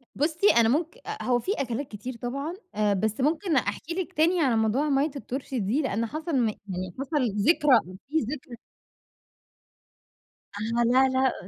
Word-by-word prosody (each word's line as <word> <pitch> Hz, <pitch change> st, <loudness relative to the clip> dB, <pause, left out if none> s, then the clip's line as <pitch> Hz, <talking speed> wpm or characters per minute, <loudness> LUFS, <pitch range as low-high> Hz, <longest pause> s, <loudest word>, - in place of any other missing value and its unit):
بُصّي 320 Hz, +7 st, +2 dB
أنا 225 Hz, -1 st, +5 dB
ممك 325 Hz, -, 0 dB
أأ، -, -, -5 dB
هو 245 Hz, -1 st, +2 dB
في 375 Hz, -, -2 dB
أكلات 255 Hz, +1 st, -2 dB
كتير 230 Hz, +4 st, -7 dB
طبعًا 275 Hz, +7 st, -3 dB, 0.2 s
آآ 210 Hz, -1 st, +2 dB
بس 215 Hz, +5 st, -1 dB
ممكن 315 Hz, +4 st, +1 dB
أحكي 300 Hz, +5 st, -1 dB
لِك 370 Hz, +1 st, -4 dB
تاني 340 Hz, +2 st, +3 dB
على 260 Hz, -6 st, +3 dB
موضوع 225 Hz, +7 st, +1 dB
ميّة 280 Hz, +2 st, +2 dB
الطرشي 265 Hz, -2 st, -4 dB
دي 220 Hz, +10 st, +1 dB
لأن 230 Hz, -4 st, -1 dB
حصَل 310 Hz, +5 st, -3 dB
م 240 Hz, -3 st, +3 dB
يعني 185 Hz, -3 st, -6 dB
حصَل 275 Hz, -5 st, 0 dB
ذكرى 295 Hz, +4 st, +4 dB
وفي 200 Hz, +12 st, -5 dB, 0.2 s
ذكر 270 Hz, -4 st, -9 dB, 2.1 s
أها، 230 Hz, +2 st, 0 dB
لا، 255 Hz, +3 st, +4 dB
لأ 260 Hz, -7 st, 0 dB
260 Hz, 160 wpm, -26 LUFS, 225-305 Hz, 2.1 s, أنا